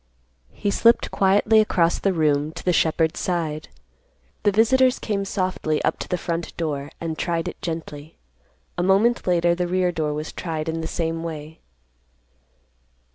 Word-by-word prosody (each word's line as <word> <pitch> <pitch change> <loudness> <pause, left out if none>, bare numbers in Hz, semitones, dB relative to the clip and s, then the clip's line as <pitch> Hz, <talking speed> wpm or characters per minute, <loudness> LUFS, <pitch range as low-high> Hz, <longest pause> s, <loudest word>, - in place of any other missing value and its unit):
He 205 - -2
slipped 230 +3 +3
quietly 200 +3 +4
across 175 -5 +2
the 195 - +1
room 150 -3 +1
to 165 - -9
the 180 - +3
shepherd's 160 0 +1
side. 160 -4 -2 0.7
The 205 - +3
visitors 250 +5 +4
came 200 -2 -2
softly 185 -6 -1
up - - 0
to - - -5
the 180 - -1
front 170 -1 -4
door, 145 -4 -3
and 160 -1 -4
tried 170 -1 -1
it - - -7
gently. 160 -2 -6 0.6
A - - +2
moment 195 +6 +2
later 175 -1 +3
the 175 0 -1
rear 180 0 +1
door 155 -3 -2
was 155 +1 -5
tried 160 -2 -4
in 165 0 -2
the 160 - -3
same 165 -1 -2
way. 160 -1 -7
170 Hz, 160 wpm, -23 LUFS, 160-190 Hz, 0.7 s, quietly